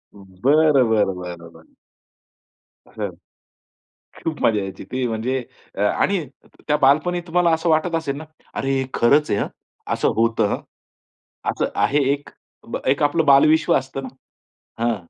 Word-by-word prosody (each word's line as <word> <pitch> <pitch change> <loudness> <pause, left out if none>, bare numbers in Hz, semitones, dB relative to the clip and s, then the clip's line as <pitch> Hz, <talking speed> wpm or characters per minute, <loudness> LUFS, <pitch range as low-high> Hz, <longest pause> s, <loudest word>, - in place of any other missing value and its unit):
बरं, 130 +8 +2
बरं, 105 -4 +2
बरं, 85 -2 -8
बरं. 290 - -20 1.1
हं, - - -5 1.1
खूप 160 -2 -3
मजा 110 -2 +3
यायची 95 -1 -7
ती 130 0 -1
म्हणजे. 120 +3 -2 0.4
आणि 170 - +1 0.4
त्या 150 - +3
बालपणी 155 +6 +3
तुम्हाला 175 0 +2
असं 160 +1 0
वाटत 160 +2 +2
असेल 155 -4 -2
ना, 155 - -7 0.3
अरे 135 - -2
हे - - -2
खरंच 145 +6 +3
आहे! 100 - +1
हं, - - -1 0.5
असं - - +1
होतं. 115 0 +1 0.9
असं - - -2
आहे 145 - +2
एक. 145 0 -7 0.6
एक 135 +3 +2
आपलं 155 +2 +2
बालविश्व 155 +3 +5
असतं 135 +1 -5
ना. 130 - -6 0.7
हां. 120 -1 +2
135 Hz, 135 wpm, -21 LUFS, 115-155 Hz, 1.1 s, बालविश्व